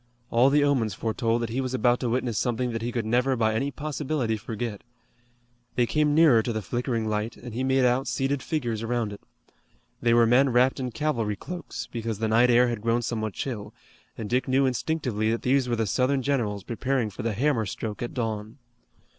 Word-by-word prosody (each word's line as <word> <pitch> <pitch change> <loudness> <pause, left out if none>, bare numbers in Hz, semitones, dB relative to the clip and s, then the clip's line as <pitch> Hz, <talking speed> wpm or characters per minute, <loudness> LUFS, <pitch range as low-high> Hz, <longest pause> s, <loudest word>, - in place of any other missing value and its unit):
All 120 +3 +5
the 145 +1 +4
omens 120 -9 +1
foretold 115 +1 0
that 115 - -3
he 130 +3 -1
was 130 0 -2
about 125 -1 +3
to 125 - -1
witness 120 -2 0
something 125 0 -1
that 115 -1 -3
he 120 +1 -2
could 120 -2 -2
never 125 +4 +2
by 110 -2 +1
any 135 +6 0
possibility 145 -4 -2
forget. 110 0 -5 0.9
They 120 - +3
came 150 +3 +1
nearer 155 -8 +6
to 120 - -3
the 110 -2 -3
flickering 120 +1 -2
light, 110 +1 -2
and 120 -1 -9
he 125 +3 -2
made 130 -1 +3
out 125 +2 +2
seated 135 0 -1
figures 120 -9 -2
around 115 -2 -1
it. 100 - -11 0.8
They 120 0 +3
were 120 -1 +6
men 130 +4 +4
wrapped 125 +2 +3
in 130 -1 -2
cavalry 115 -4 -1
cloaks, 180 - -6
because 115 -2 -3
the 110 +1 -1
night 115 +3 +4
air 125 +1 +5
had 120 -2 -2
now - - -17
grown 115 +1 +1
somewhat 110 -2 -2
chill, 115 -7 -5 0.4
and 110 - -4
Dick 125 +4 0
knew 135 +1 +3
instinctively 125 -3 -1
that 115 +1 -1
these 130 0 +2
were 120 - +1
the 115 -1 0
Southern 130 +6 +1
generals 110 -8 -1
preparing 120 -1 -1
for - - -7
the 115 -1 -1
hammer 120 -1 +1
stroke 105 +1 -5
at 120 - -4
dawn. 110 -1 -3
120 Hz, 210 wpm, -26 LUFS, 110-130 Hz, 0.9 s, nearer